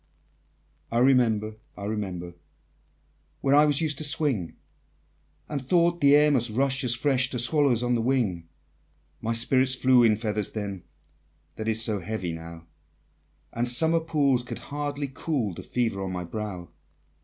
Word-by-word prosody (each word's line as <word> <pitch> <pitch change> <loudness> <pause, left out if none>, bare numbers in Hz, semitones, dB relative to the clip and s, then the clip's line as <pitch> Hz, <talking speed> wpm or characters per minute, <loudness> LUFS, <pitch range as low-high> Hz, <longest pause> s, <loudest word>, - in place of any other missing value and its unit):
I 115 - -1
remember, 115 -4 +2 0.2
I 100 - -8
remember, 95 -5 -5 1.1
Where 135 - +1
I 150 +1 +6
was 145 0 +2
used 155 -4 -1
to - - -2
swing, 145 - 0 0.9
And 145 -3 -4
thought 170 +4 +1
the 140 0 +6
air 150 0 +4
must 120 -4 +1
rush 135 +4 0
as 120 -1 +4
fresh 130 0 +2
To 125 - -4
swallows 125 -1 +2
on 125 0 0
the 120 - 0
wing; 110 -10 -1 0.7
My 115 +1 -2
spirit 130 +3 +2
flew 130 -1 +4
in 115 -2 +4
feathers 105 -2 -3
then, 100 -4 -5 0.7
That 110 - -6
is 110 0 +1
so 110 -3 0
heavy 95 -1 -4
now, 80 0 -10 0.9
And 120 +1 0
summer 160 +7 +5
pools 145 -6 +1
could 120 - -7 0.2
hardly 145 -1 -3
cool 135 - -3
The - - -8
fever 115 -6 -2
on 95 -1 -4
my 90 -1 -4
brow! 95 -2 -6
120 Hz, 155 wpm, -25 LUFS, 105-140 Hz, 1.1 s, I